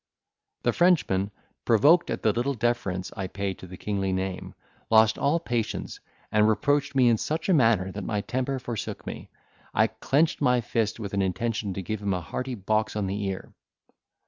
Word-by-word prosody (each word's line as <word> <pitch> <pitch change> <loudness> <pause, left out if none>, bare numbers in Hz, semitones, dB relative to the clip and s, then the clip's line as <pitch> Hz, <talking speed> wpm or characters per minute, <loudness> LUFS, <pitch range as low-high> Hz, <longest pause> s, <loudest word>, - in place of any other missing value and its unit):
The - - +2
Frenchman, 145 - +3 0.3
provoked 145 +10 +5
at - - -3
the 110 - +3
little 130 +5 -1
deference 105 -6 -1
I 95 - -3
paid 100 0 -4
to 95 - -10
the 90 +1 -10
kingly 100 -1 -2
name, 95 0 -3 0.3
lost 110 -1 +5
all 155 +4 +2
patience, 120 -8 -3 0.3
and 105 0 +4
reproached 140 +7 +1
me 130 -2 +5
in 115 -2 +4
such 155 +8 -2
a 190 - +4
manner 115 - +3
that 100 +1 -6
my 105 +2 -1
temper 130 +4 -2
forsook 120 -4 -5
me, - - -7 0.5
I - - +5
clenched 150 +4 +1
my 125 0 +4
fist, 115 -1 -1
with 100 -3 -5
an 100 - +1
intention 100 +1 -1
to 95 - -4
give 110 +3 -4
him 100 -2 0
a - - -2
hearty 125 +10 -4
box 110 +1 0
on 105 -2 -1
the 100 +2 -2
ear. 95 -1 -5
110 Hz, 185 wpm, -26 LUFS, 95-125 Hz, 0.5 s, provoked